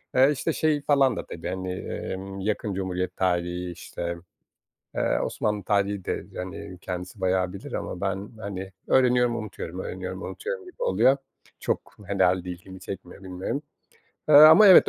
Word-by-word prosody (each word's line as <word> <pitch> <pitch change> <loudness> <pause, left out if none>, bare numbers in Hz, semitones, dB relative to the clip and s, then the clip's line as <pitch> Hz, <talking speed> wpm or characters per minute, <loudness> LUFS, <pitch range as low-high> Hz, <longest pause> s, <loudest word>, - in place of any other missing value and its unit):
Eee, 130 +2 +7
işte, 160 +3 -1
şey 150 -2 +2
falan 140 -4 +4
da - - -4
tabii, 85 - -7
hani, 95 0 -3
emm, 95 +1 -5
yakın 105 +1 -1
Cumhuriyet 90 -1 -2
tarihi, 90 -1 0
işte, 85 0 -5 0.8
eee, - - +1
Osmanlı 105 -1 -1
tarihi 100 0 +1
de, - - -2
hani, 90 0 -6
kendisi 90 +1 -6
bayağı 95 -1 +1
bilir 100 - -8
ama 90 - -4
ben, 100 +1 -2
hani, 95 -2 -5 0.2
öğreniyorum, 125 -2 +4
unutuyorum; 110 -2 -5
öğreniyorum, 485 -1 -5
unutuyorum 440 -1 -5
gibi 370 +7 -7
oluyor. 140 - +4 0.4
Çok - - -2
herhâlde 95 -2 +2
ilgimi 95 +2 -10
çekmiyor, 95 0 -8
bilmiyorum. 95 +9 -3 0.7
Eee, 155 - +6
ama 155 +8 +10
evet, 190 - +9
95 Hz, 150 wpm, -26 LUFS, 90-130 Hz, 0.8 s, ama